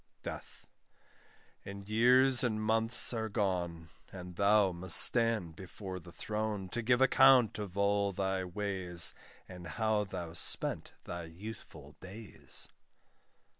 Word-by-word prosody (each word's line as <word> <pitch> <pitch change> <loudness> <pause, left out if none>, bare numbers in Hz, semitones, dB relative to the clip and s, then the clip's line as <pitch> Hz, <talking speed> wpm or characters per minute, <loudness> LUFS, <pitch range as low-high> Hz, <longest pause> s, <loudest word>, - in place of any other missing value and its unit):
DEATH. - - -10 1.0
And 100 0 -10
years 125 +4 +4
and 110 -3 -2
months 115 +3 +2
are 110 -1 -4
gone, 90 -6 -4 0.2
And 90 -2 -11
thou 100 0 +2
must 85 0 +3
stand 115 -9 +5
before 95 +1 -9
the 85 0 -15
throne, 105 -1 -5
To 120 +5 -5
give 120 +2 0
account 130 -4 +4
of 100 -2 -8
all 100 0 0
thy 95 0 -3
ways, 95 -2 0 0.3
And 90 -2 -11
how 110 +4 -2
thou 90 -4 -8
spent 85 - -3
thy 85 -1 -8
youthful 95 +7 -12
days. 100 +3 -9
100 Hz, 125 wpm, -31 LUFS, 90-110 Hz, 1.0 s, stand